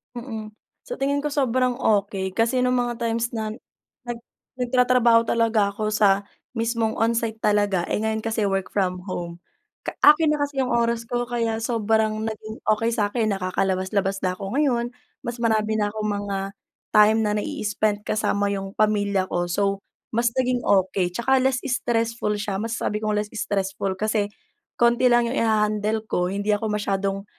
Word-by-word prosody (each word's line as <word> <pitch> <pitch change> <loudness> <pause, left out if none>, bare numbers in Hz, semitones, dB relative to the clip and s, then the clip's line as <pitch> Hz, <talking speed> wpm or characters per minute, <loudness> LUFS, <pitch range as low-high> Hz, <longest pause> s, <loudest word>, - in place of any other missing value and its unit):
Mm. 220 -3 -6 0.3
Sa - - -5
tingin 285 - -1
ko 295 - -1
sobrang 255 -2 +1
okey. 200 -4 +1
Kasi 235 +3 +2
nung 250 0 +2
mga 240 -1 -2
times 230 +1 -1
na 220 -1 -2 0.6
nag 240 -1 -4 0.4
nagtatrabaho 245 -2 +4
talaga 225 -3 +2
ako 215 0 -2
sa 200 -2 +3 0.3
mismong 230 -1 0
onsite 225 -1 0
talaga, 205 -3 +2
eh - - +1
ngayon 220 +1 -1
kasi 225 -1 -1
work 195 -1 -1
from 185 -2 -1
home. 170 -1 -5 0.4
Ka - - -6
akin 300 +1 +7
na 300 - +1
kasi 285 -1 -1
yung 255 - -1
oras 235 -1 +1
ko 245 0 -1
kaya 230 -2 -1
sobrang 220 -1 0
naging 220 0 -8
okey 225 +2 +2
sakin. 215 0 0
Nakakalabas-labas 190 +1 -1
na 185 0 -1
ako 195 +2 -5
ngayon, 245 -4 +1 0.3
mas 235 0 -4
marami 220 -1 +1
na 205 - +1
akong 215 0 -4
mga 205 -1 -2 0.6
time 215 +1 +6
na 210 - +1
na-i-spend 210 0 -1
kasama 205 -1 0
yung 195 -1 -4
pamilya 205 -3 +2
ko. 175 -1 -2
So 195 +2 0 0.3
mas 235 +1 +2
naging 250 -1 +1
okey. 190 -3 +2
Tsaka 260 +7 +1
less 260 0 +2
stressful 230 -4 0
siya. 200 -1 -3
Masasabi 220 -1 -2
kong 215 -1 0
less 210 +1 -3
stressful 195 -2 -2
kasi 215 0 0 0.5
konti 240 +1 +4
lang 240 0 +4
yung 255 - -2
i-hahandle 215 0 +1
ko, 180 -4 0
hindi 200 +2 -3
ako 205 +2 -1
masyadong 195 -1 -1
220 Hz, 160 wpm, -24 LUFS, 205-235 Hz, 0.6 s, akin